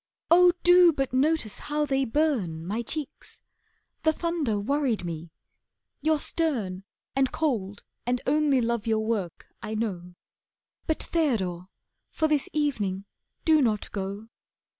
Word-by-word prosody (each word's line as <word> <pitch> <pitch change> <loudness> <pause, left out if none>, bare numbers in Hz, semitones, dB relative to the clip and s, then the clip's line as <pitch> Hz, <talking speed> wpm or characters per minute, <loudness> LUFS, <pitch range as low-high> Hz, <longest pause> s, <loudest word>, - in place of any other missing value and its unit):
Oh, 355 +1 +8
do 355 -1 +7
but 270 -4 -2
notice 275 -4 +1
how 300 0 -1
they 270 -1 +1
burn, 225 - 0
My 210 +6 -2
cheeks! 290 +5 -7 0.6
The 315 - +3
thunder 315 -10 -1
worried 250 -3 0
me. 165 -1 -6 0.7
You're 315 0 +2
stern, 225 - -2 0.3
And 270 -1 +2
cold, 215 -11 -2 0.2
and 250 0 +1
only 285 -2 +3
love 235 -1 -1
your 220 -1 +1
work, 205 -7 -3
I 215 - -4
know. 180 -5 -4 0.7
But 315 - 0
Theodore, 190 - -1 0.4
for 315 - 0
this 300 -3 +1
evening, 210 -11 -1 0.4
do 315 -2 +5
not 220 -5 0
go." 200 +2 -5
250 Hz, 130 wpm, -27 LUFS, 205-305 Hz, 0.7 s, Oh